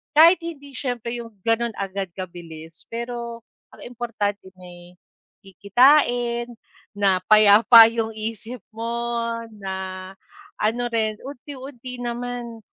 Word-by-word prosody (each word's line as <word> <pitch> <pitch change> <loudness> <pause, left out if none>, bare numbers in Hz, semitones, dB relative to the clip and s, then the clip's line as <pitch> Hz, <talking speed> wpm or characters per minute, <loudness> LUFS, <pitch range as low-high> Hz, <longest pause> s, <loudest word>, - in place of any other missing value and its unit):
kahit 335 +5 +7
hindi 285 -4 -8
siyempre 245 -3 -4
'yung 230 -1 -9 0.2
gano'n 230 +1 +2
agad 195 -1 -4
kabilis, 165 -3 -9
pero 235 0 -5 0.4
ang - - -19
importante 225 -5 -4
may 175 0 -14 0.5
kikitain, 240 - +2 0.5
na 190 -2 +2
payapa 215 +2 +8
'yung 225 -1 -2
isip 225 +2 -6 0.2
mo, 225 - -6 0.7
na 190 -1 -6 0.5
ano 225 +3 0
rin, 220 -2 0
unti-unti 260 -2 -9
naman 240 -1 -5
230 Hz, 105 wpm, -23 LUFS, 200-245 Hz, 0.7 s, payapa